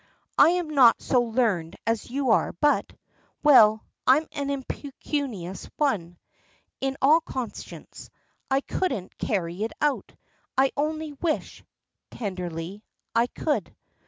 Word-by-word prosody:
"I - - +8
am 345 -2 -1
not 260 -6 +6
so 250 - +2
learned 220 -9 0
as 225 0 -1
you 265 -1 0
are, - - +2
but 290 - +1 0.5
Well, 220 -7 +6 0.2
I'm 285 +5 +5
an 280 -1 -3
'impecunious 270 - -4
one,' 185 - 0 0.6
in 270 0 -2
all 310 +4 +6
conscience. 255 -6 -7 0.4
I 270 0 +2
couldn't 275 - -3
carry 180 -3 -2
it 225 - -3
out. 295 -2 -1 0.4
I 265 0 +4
only 310 +1 -2
wish," 310 +2 -3 0.5
tenderly, 180 -2 -5 0.3
"I 235 +1 +3
could." 300 +4 -2
255 Hz, 120 wpm, -26 LUFS, 210-290 Hz, 0.6 s, I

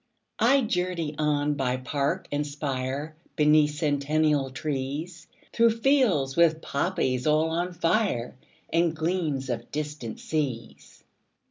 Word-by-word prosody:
20 240 +4 +5
I 275 - +5
journey 180 -6 -2
on 150 -1 +1
by 130 -3 -1
park 140 +2 -2
and 145 +1 -1
spire, 140 +1 -3 0.2
Beneath 150 -1 +4
centennial 145 -1 +1
trees, 150 +5 -4 0.3
Through 230 -1 +3
fields 225 - +2
with 165 -2 +4
poppies 140 -5 -1
all 155 +1 +3
on 175 +2 -1
fire, 170 - 0 0.4
And 165 -1 +2
gleams 160 -5 -1
of 120 0 -5
distant 150 -6 -5
seas. 140 -7 -4
150 Hz, 120 wpm, -26 LUFS, 140-170 Hz, 0.4 s, 20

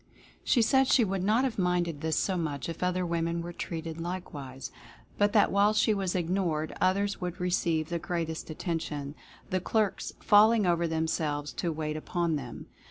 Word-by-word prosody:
She 240 - +3
said 265 +3 +4
she 250 - +5
would 195 -1 -2
not 220 +6 +3
have 250 -6 -1
minded 175 -4 0
this 160 0 0
so 190 - +1
much 155 -5 -3
if 165 -1 -6
other 180 0 0
women 170 0 -1
were 175 0 -6
treated 165 -1 -5
likewise, 145 -7 -6 0.5
but 205 0 +4
that 210 - +4
while 200 +2 +4
she 215 0 +3
was 195 -3 -1
ignored 170 -3 -1
others 200 +2 +1
would 180 +1 -4
receive 170 -3 0
the 170 0 -2
greatest 165 -2 -3
attention, 155 -3 -3 0.4
the 185 - +1
clerks 210 +2 -1
"falling 215 +1 +5
over 170 -1 +2
themselves" 155 -3 -1
to 170 - -2
wait 155 -1 -3
upon 170 +1 -1
them. 130 -5 -6
175 Hz, 170 wpm, -29 LUFS, 160-195 Hz, 0.5 s, she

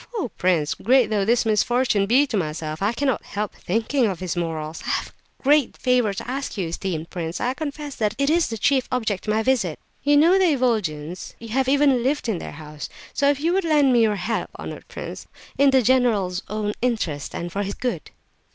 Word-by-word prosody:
Oh, 355 - -2
prince, 170 -4 +1
great 245 -1 +3
though 205 -2 +1
this 235 +2 +2
misfortune 220 -1 +2
be 260 +6 +5
to 255 - -4
myself, 155 -3 -3
I 200 +2 +2
cannot 265 -2 -1
help 210 0 -4
thinking 230 +6 0
of 190 -4 -3
his 185 -1 -3
morals! 160 -2 -3
I - - -5
have - - 0 0.3
a - - -28
great 285 -1 +3
favour 250 -4 +2
to 210 +4 -6
ask 270 +3 -3
of - - -10
you, 185 -4 -1
esteemed 170 -2 -4
prince; 170 -1 -4
I 250 +1 0
confess 295 -1 -6
that 215 -1 0
it 280 0 +1
is 330 +3 +3
the 225 - -4
chief 260 +4 +2
object 220 -6 -1
of - - +2
my 220 - +1
visit. 220 -11 +1 0.2
You 290 +1 +4
know 340 +6 +5
the 360 -5 +4
Ivolgins, 180 - -2
you 230 - -10
have 260 +3 +1
even 275 -3 +4
lived 270 +2 0
in 210 -7 -1
their - - -7
house; 150 0 -8 0.2
so 280 - +2
if 285 -1 +1
you 330 +4 +1
would 385 +1 +2
lend 295 -5 +4
me 240 - +5
your 215 -2 +3
help, 210 +4 -2
honoured - - -8
prince, - - -8 0.3
in 280 0 +6
the 265 -2 +4
general's 215 -7 +2
own 210 0 -2
interest 215 - -2
and 175 0 -4
for 200 - -2
his 200 0 -3
good." 250 -1 -3
225 Hz, 220 wpm, -23 LUFS, 185-265 Hz, 0.3 s, in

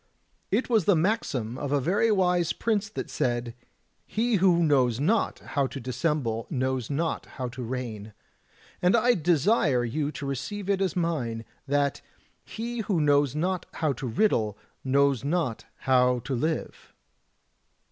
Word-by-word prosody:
It 225 +6 +1
was 220 -7 +2
the 200 - +5
maxim 150 - -1
of 140 -1 -3
a 145 - +3
very 200 - +2
wise 180 -4 +2
prince 215 -1 -1
that 120 - -2 0.5
*he 230 +1 +1
who 175 -2 +4
knows 130 -6 +3
not 200 +11 +1
how 140 -2 -1
to 135 - -7
dissemble 125 -2 -1
knows 130 -2 -1
not 160 +3 -2
how 125 -2 -3
to 125 +1 -8
reign; 115 -4 -5 0.3
' - - -29
and 180 +4 +4
I 245 +2 +4
desire 160 - +2
you 145 +5 -2
to 145 0 -6
receive 185 +10 -3
it 195 -1 0
as 190 -4 0
mine, 130 -10 -1 0.2
that 140 -1 +1 0.4
*he 235 +1 -5
who 200 -5 0
knows 145 -2 +3
not 180 +3 -1
how 155 -3 0
to 130 +1 -5
riddle 110 - +1 0.3
knows 140 -1 +2
not 145 -6 -1 0.2
how 125 -1 +3
to 125 +3 -4
live. 155 +6 -3
145 Hz, 150 wpm, -27 LUFS, 125-185 Hz, 0.5 s, the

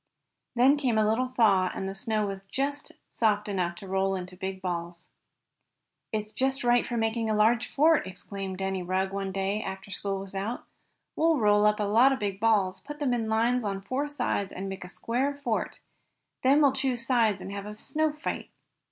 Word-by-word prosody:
Then 260 +4 +5
came 255 -6 +1
a 215 -1 +3
little 235 +4 +1
thaw, 205 -7 +3
and 190 - -3
the 195 - -4
snow 215 +2 -1
was 195 -1 -5
just 280 +9 -3 0.2
soft 210 -1 +1
enough 180 -4 -1
to 195 +3 -10
roll 195 0 +1
into 185 0 -6
big 190 0 -5
balls. 175 -2 -4 1.1
"It's 215 -1 -3
just 265 +4 0
right 240 0 +4
for 240 - -2
making 225 0 0
a 215 - +1
large 225 +3 +3
fort!" 310 -4 +3
exclaimed 190 0 -6
Danny 190 0 -2
Rugg 190 +2 -1
one 195 -1 -2
day, 195 +2 -1
after 190 +1 -6
school 195 0 -2
was 195 0 -7
out. 200 +5 -3 0.5
"We'll 325 0 +3
roll 210 -2 +4
up 210 0 +2
a - - +1
lot 230 +6 +5
of 270 - +1
big 200 -3 -3
balls, 210 -4 +2
put 295 +1 -9
them 285 -4 0
in 225 -2 -1
lines 235 +3 +2
on 200 -2 -2
four 255 +9 -2
sides 245 -8 -2
and 195 +1 -5
make 195 -1 -6
a 180 - -9
square 255 +9 -1
fort. 250 -6 -3 0.6
Then, 280 +3 +5
we'll 275 -2 +5
choose 260 -3 -1
sides 230 -5 +2
and 190 +1 -7
have 200 0 -5
a 210 0 -8
snow 310 +6 0
fight." 300 +1 -5
210 Hz, 200 wpm, -28 LUFS, 195-250 Hz, 1.1 s, Then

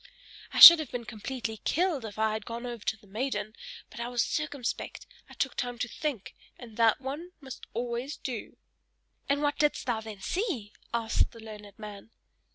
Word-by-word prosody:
I - - -5
should 340 -1 +14
have 305 -5 -4
been 240 -1 -5
completely 225 0 -5
killed 325 - 0
if 210 -1 -8
I 220 0 +1
had 220 0 -4
gone 235 +2 -6
over 240 -3 -6
to 220 - -1
the 210 - -22
maiden; 215 +1 -3 0.4
but - - -10
I 235 - -3
was 245 -1 +1
circumspect, 290 -5 -3 0.2
I - - -13
took 270 - -1
time 245 -1 -3
to 250 - -2
think, 250 -4 -4 0.2
and 230 -4 -12
that 225 -2 +4
one 300 +7 -6
must 265 -3 -10
always 240 +4 -3
do." 245 -5 -6 0.7
"And 285 +1 +1
what 290 -1 0
didst 295 -1 +1
thou 235 -3 -1
then 215 -2 -9
see?" 315 - -2 0.2
asked 230 -1 +1
the 230 - -12
learned 210 -2 -11
man. 210 -1 -9
240 Hz, 185 wpm, -29 LUFS, 220-275 Hz, 0.7 s, should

